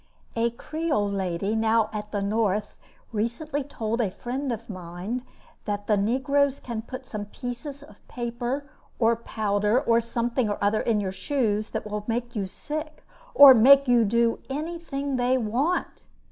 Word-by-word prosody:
A 230 +1 +2
creole 295 -4 -2
lady, 195 +1 -1
now 220 0 +2
at 210 0 -5
the 205 -2 -1
North, 210 0 0 0.4
recently 240 +7 -2
told 230 -4 -2
a 210 - +1
friend 255 +7 -4
of 230 0 -5
mine 185 +5 -5 0.4
that 205 -1 -3
"the 210 - +3
negroes 270 +6 +1
can 235 -3 -5
put 255 +3 -8
some 210 -4 -5
pieces 250 +6 -7
of 210 -7 -16
paper, 240 +4 -3 0.3
or 230 -1 +3
powder, 210 0 0
or 235 -4 +3
something 235 0 -1
or 205 - -1
other 205 +2 +2
in 225 -3 +1
your 190 -2 -2
shoes, 215 +1 -1
that - - -4
will 210 0 -4
make 240 +1 -2
you 200 -3 -1
sick, 305 +9 -6 0.3
or 280 -2 +11
make 270 +4 +7
you 240 -2 +5
do 230 +2 +2
anything 285 -2 -3
they 250 +1 +2
want!" 255 +10 -1
235 Hz, 160 wpm, -26 LUFS, 210-265 Hz, 0.4 s, or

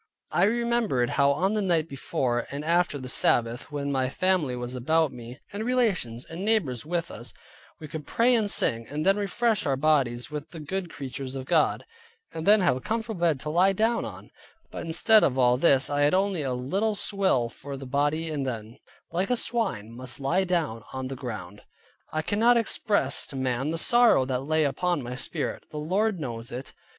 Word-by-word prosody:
I - - +3
remembered 230 - +1
how 140 0 +3
on 180 +9 +1
the 215 - 0
night 170 -5 +1
before 130 -3 -2
and 145 +2 -5
after 170 -2 +2
the 130 -2 -7
Sabbath, 120 0 +1
when 140 -1 -3
my 130 -2 0
family 180 -5 +1
was 125 0 -5
about 155 +4 +1
me, 120 +1 -10
and 205 +2 -3
relations 205 - 0
and 170 +3 -7
neighbors 190 - 0
with 170 +1 -3
us, 120 +3 -9 0.4
we 155 - -8
could 150 -1 -7
pray 240 +2 +3
and 220 -4 +2
sing, 115 -10 +2
and 150 +3 -3
then 195 +1 +5
refresh 205 +1 0
our 135 - +2
bodies 135 -4 +1
with 150 0 -6
the 165 - -9
good 180 +4 -4
creatures 135 -2 -6
of 130 -1 -5
God; - - +2 0.5
and 160 +2 -5
then 210 0 +7
have 175 -8 +3
a 130 - -6
comfortable 220 - -3
bed 165 -5 +2
to 150 - -4
lie 185 +4 +4
down 225 +4 +1
on; - - -9 0.4
but - - -6
instead 215 +7 +5
of 130 - +2
all 125 -1 +4
this, 135 -1 +4
I 145 0 -1
had 145 +5 +4
only 190 -3 +1
a 135 -3 -2
little 195 - -1
swill 195 - +1
for 140 +4 -8
the 135 - -8
body 145 +4 0
and 145 -3 -2
then, 115 -3 -5 0.3
like 180 +4 -1
a 250 - +3
swine, 205 - -2
must 125 +1 -6
lie 170 +8 +1
down 160 - -1
on 130 0 -4
the 135 - -5
ground. 105 -6 -7 0.5
I 155 0 -2
cannot 230 +7 +3
express 215 -2 +1
to - - -8
man 130 +1 -1
the 165 - -2
sorrow 240 - +5
that 130 -1 -1
lay 155 +1 +2
upon 150 +2 0
my 120 +1 -5
spirit; 125 - -4
the 150 - -8
Lord 190 +6 0
knows 120 -3 -6
it. 125 +3 -7
150 Hz, 200 wpm, -26 LUFS, 130-190 Hz, 0.5 s, then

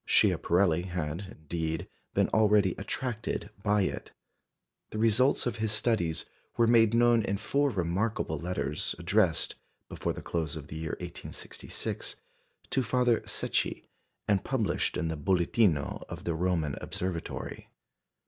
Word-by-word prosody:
Schiaparelli 85 -1 +3
had, 90 +2 -4
indeed, 80 +2 -3 0.3
been - - +4
already 105 -4 +4
attracted 120 -4 -3
by 105 -1 +3
it. - - -3 0.8
The - - -6
results 115 +5 +3
of 120 -2 -1
his 110 -1 0
studies 105 -7 +1 0.3
were 120 - +5
made 115 -1 +5
known 120 -1 +5
in 100 -1 -1
four 140 +7 +1
remarkable 90 - -1
letters, 85 -3 -1
addressed, 85 0 +2 0.4
before - - -2
the - - -8
close 80 -3 -2
of 75 -2 -8
the - - -7
year 80 -1 -3
1866, - - -5 0.6
to 135 - +3
Father 125 -1 +2
Secchi, - - 0 0.4
and 100 -2 +2
published 125 -6 0
in 85 -2 0
the 80 - -2
Bulletino 85 0 +2
of - - -7
the 85 - -1
Roman 80 -3 0
Observatory. 90 -2 -4
95 Hz, 130 wpm, -30 LUFS, 85-115 Hz, 0.8 s, were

